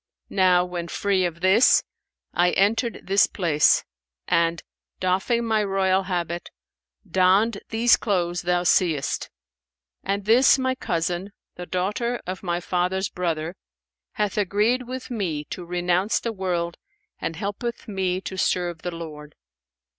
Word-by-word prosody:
Now 180 Hz, -2 st, +4 dB
when 175 Hz, -1 st, -5 dB
free 190 Hz, +1 st, 0 dB
of 170 Hz, -1 st, -4 dB
this, 190 Hz, +6 st, +5 dB, 0.5 s
I 175 Hz, 0 st, +3 dB
entered 225 Hz, +4 st, +1 dB
this 195 Hz, +1 st, +4 dB
place 160 Hz, -5 st, +2 dB, 0.4 s
and, 170 Hz, 0 st, +1 dB, 0.4 s
doffing 190 Hz, +6 st, +1 dB
my 220 Hz, -2 st, +2 dB
royal 195 Hz, -1 st, +2 dB
habit, 175 Hz, -2 st, -3 dB, 0.6 s
donned 190 Hz, +5 st, +3 dB
these 230 Hz, +1 st, +4 dB
clothes 175 Hz, -4 st, -1 dB
thou 175 Hz, 0 st, +1 dB
seest; 165 Hz, -5 st, +1 dB, 0.7 s
and 195 Hz, 0 st, -2 dB
this 245 Hz, +5 st, +6 dB
my 260 Hz, -1 st, 0 dB
cousin, 175 Hz, -4 st, -2 dB, 0.2 s
the 180 Hz, 0 st, -8 dB
daughter 210 Hz, +7 st, -1 dB
of 185 Hz, +1 st, -5 dB
my 175 Hz, -2 st, -1 dB
father's 180 Hz, +2 st, -1 dB
brother, 170 Hz, -1 st, -2 dB, 0.6 s
hath 210 Hz, -1 st, -1 dB
agreed 215 Hz, +6 st, +1 dB
with 255 Hz, 0 st, -6 dB
me 175 Hz, -10 st, -2 dB
to 180 Hz, -, -5 dB
renounce 180 Hz, +3 st, +1 dB
the 230 Hz, -, -3 dB
world 175 Hz, -3 st, -2 dB, 0.4 s
and 165 Hz, -, -3 dB
helpeth 205 Hz, +6 st, -4 dB
me 190 Hz, -3 st, -1 dB
to 190 Hz, -, -6 dB
serve 175 Hz, -2 st, 0 dB
the 180 Hz, -, -3 dB
Lord. 150 Hz, -3 st, -9 dB
185 Hz, 130 wpm, -24 LUFS, 175-205 Hz, 0.7 s, this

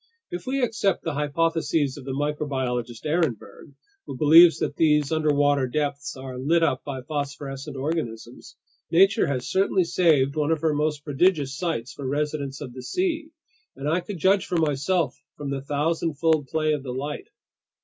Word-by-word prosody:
If 175 Hz, +5 st, -6 dB
we 265 Hz, 0 st, 0 dB
accept 215 Hz, -5 st, 0 dB
the 165 Hz, -, -2 dB
hypotheses 150 Hz, -1 st, 0 dB
of 140 Hz, -, -10 dB
the 135 Hz, -, -4 dB
microbiologist 130 Hz, -4 st, -2 dB
Ehrenberg—who 155 Hz, -, -4 dB
believes 165 Hz, +3 st, +7 dB
that -, -, -2 dB
these 150 Hz, -2 st, +3 dB
underwater 145 Hz, -3 st, +2 dB
depths 145 Hz, +1 st, -3 dB
are 130 Hz, -1 st, -7 dB
lit 165 Hz, +6 st, +2 dB
up 140 Hz, -5 st, +1 dB
by 135 Hz, -3 st, -6 dB
phosphorescent 140 Hz, -1 st, -5 dB
organisms—nature 150 Hz, -, -1 dB
has 130 Hz, -3 st, -2 dB
certainly 190 Hz, -1 st, +2 dB
saved 155 Hz, -6 st, +2 dB
one 150 Hz, -1 st, 0 dB
of 160 Hz, -2 st, +1 dB
her 160 Hz, -2 st, +2 dB
most 150 Hz, 0 st, -1 dB
prodigious 145 Hz, -2 st, +1 dB
sights 155 Hz, -7 st, -3 dB
for 140 Hz, -, -6 dB
residents 145 Hz, -1 st, -2 dB
of 130 Hz, -4 st, -7 dB
the 130 Hz, -, -8 dB
sea, 325 Hz, -, -2 dB, 0.5 s
and 135 Hz, +2 st, -5 dB
I 165 Hz, +4 st, +2 dB
could 190 Hz, +2 st, -7 dB
judge 190 Hz, +4 st, +2 dB
for 175 Hz, -, -1 dB
myself 160 Hz, +1 st, 0 dB, 0.2 s
from 145 Hz, -2 st, -5 dB
the 135 Hz, -1 st, -3 dB
thousandfold 155 Hz, +1 st, 0 dB
play 155 Hz, +2 st, 0 dB
of 150 Hz, -, -2 dB
the 130 Hz, -2 st, -6 dB
light. 145 Hz, +3 st, -5 dB
150 Hz, 160 wpm, -25 LUFS, 135-165 Hz, 0.5 s, believes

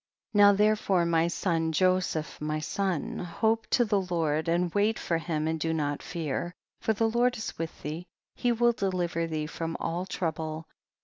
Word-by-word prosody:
39. 205 Hz, -1 st, +7 dB
Now -, -, -1 dB
therefore 210 Hz, -4 st, +3 dB
my 165 Hz, 0 st, +3 dB
son, 165 Hz, -2 st, 0 dB
Joseph 185 Hz, -3 st, +1 dB
my 155 Hz, 0 st, -1 dB
son, 175 Hz, +1 st, -2 dB
hope 220 Hz, +6 st, 0 dB
to 240 Hz, -, +3 dB
the 205 Hz, -2 st, +2 dB
Lord, 160 Hz, -4 st, 0 dB
and 170 Hz, +1 st, +1 dB
wait 210 Hz, +2 st, +2 dB
for 165 Hz, -1 st, -1 dB
him 155 Hz, -1 st, -2 dB
and 160 Hz, 0 st, -1 dB
do 160 Hz, +1 st, 0 dB
not 145 Hz, -2 st, -1 dB
fear, 170 Hz, +1 st, -3 dB, 0.2 s
for 220 Hz, -, +1 dB
the 225 Hz, +2 st, +1 dB
Lord 240 Hz, +2 st, +2 dB
is 220 Hz, -, -5 dB
with 165 Hz, -1 st, -5 dB
thee, 160 Hz, +5 st, -5 dB, 0.3 s
he 245 Hz, -, +1 dB
will 240 Hz, +1 st, +4 dB
deliver 180 Hz, -6 st, -1 dB
thee 155 Hz, -1 st, -2 dB
from 165 Hz, +1 st, -4 dB
all 175 Hz, +3 st, -2 dB
trouble. 160 Hz, -3 st, -3 dB
170 Hz, 180 wpm, -28 LUFS, 160-200 Hz, 0.3 s, 39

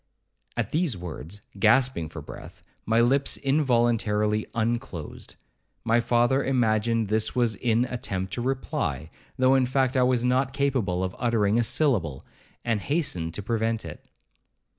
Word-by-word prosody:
At -, -, -1 dB
these 155 Hz, -, 0 dB
words, 90 Hz, +2 st, -8 dB, 0.2 s
gasping 115 Hz, -, +3 dB
for 80 Hz, -2 st, -8 dB
breath, -, -, -11 dB, 0.2 s
my 115 Hz, +1 st, +3 dB
lips 135 Hz, +4 st, +2 dB
involuntarily 115 Hz, -6 st, +1 dB
unclosed; 115 Hz, -, -4 dB, 0.5 s
my 115 Hz, +1 st, +3 dB
father 120 Hz, +3 st, +2 dB
imagined 115 Hz, -3 st, +1 dB
this 110 Hz, +1 st, 0 dB
was 120 Hz, -3 st, +1 dB
an 120 Hz, 0 st, +2 dB
attempt 100 Hz, -7 st, -4 dB
to 120 Hz, -, -3 dB
reply, 120 Hz, -, -2 dB, 0.3 s
though 130 Hz, 0 st, +4 dB
in 130 Hz, -2 st, +3 dB
fact 130 Hz, 0 st, +1 dB
I 130 Hz, -, +3 dB
was 125 Hz, -1 st, +2 dB
not 130 Hz, +1 st, +1 dB
capable 130 Hz, -10 st, 0 dB
of 95 Hz, +1 st, -3 dB
uttering 115 Hz, -3 st, +2 dB
a -, -, +3 dB
syllable, 105 Hz, -, +1 dB, 0.4 s
and 115 Hz, -3 st, 0 dB
hastened 90 Hz, -, -2 dB
to 105 Hz, -, -5 dB
prevent 115 Hz, -1 st, -1 dB
it. 80 Hz, -, -9 dB
115 Hz, 140 wpm, -26 LUFS, 105-130 Hz, 0.5 s, though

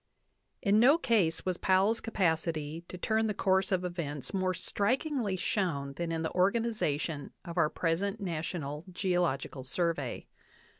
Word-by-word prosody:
In 205 Hz, +1 st, +4 dB
no 270 Hz, +7 st, +7 dB
case 220 Hz, -, +1 dB
was 185 Hz, -2 st, 0 dB
Powell's 195 Hz, +4 st, +3 dB
capacity 165 Hz, -6 st, -1 dB
to 180 Hz, -, -8 dB
turn 220 Hz, +4 st, +1 dB
the 210 Hz, -, -1 dB
course 190 Hz, 0 st, +2 dB
of 185 Hz, -1 st, +1 dB
events 150 Hz, -6 st, -4 dB
more 185 Hz, -1 st, +1 dB
strikingly 240 Hz, -, 0 dB
shown 170 Hz, -7 st, -1 dB
than 170 Hz, +3 st, -3 dB
in 165 Hz, 0 st, -1 dB
the 160 Hz, -, -1 dB
organization 180 Hz, -7 st, 0 dB
of 170 Hz, -2 st, -6 dB
our 165 Hz, -4 st, +3 dB
present 190 Hz, +7 st, -1 dB
national 155 Hz, -5 st, -3 dB
Geological 175 Hz, -8 st, -1 dB
Survey. 145 Hz, -1 st, -1 dB
180 Hz, 140 wpm, -31 LUFS, 160-200 Hz, -, no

